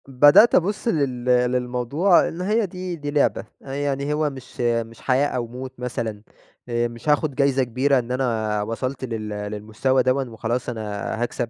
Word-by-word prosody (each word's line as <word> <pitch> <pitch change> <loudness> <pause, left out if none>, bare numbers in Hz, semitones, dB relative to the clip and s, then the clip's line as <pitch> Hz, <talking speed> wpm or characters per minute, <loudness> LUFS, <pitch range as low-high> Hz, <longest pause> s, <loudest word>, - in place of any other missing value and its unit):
بدأت 145 - +6
أبص 205 +6 +1
لل 135 - 0
للموضوع 125 +7 +2
إن 170 - -6
هي 210 +4 +1
دي 180 -1 -5
دي 145 -2 -5
لعبة، 145 -1 +1 0.2
يعني 140 +1 -2
هو 150 0 +1
مش 130 -2 -9
مش 115 -1 -1
حياة 135 +2 +2
أو 125 -4 -3
موت 125 +2 -8
مثلًا 115 -4 -4 0.5
آآ، 120 0 +1
مش 120 +5 -6
هاخد 150 -1 +2
جايزة 140 -1 +2
كبيرة 130 +3 +2
إن 120 0 -5
أنا 110 -5 0
وصلت 130 +5 -3
لل 110 -3 -4
للمستوى 105 +5 -1
دوًا 130 +2 +2
وخلاص 120 0 -3
أنا 115 -2 -4 0.4
هاكسب، 120 -1 -3
130 Hz, 160 wpm, -23 LUFS, 120-145 Hz, 0.5 s, بدأت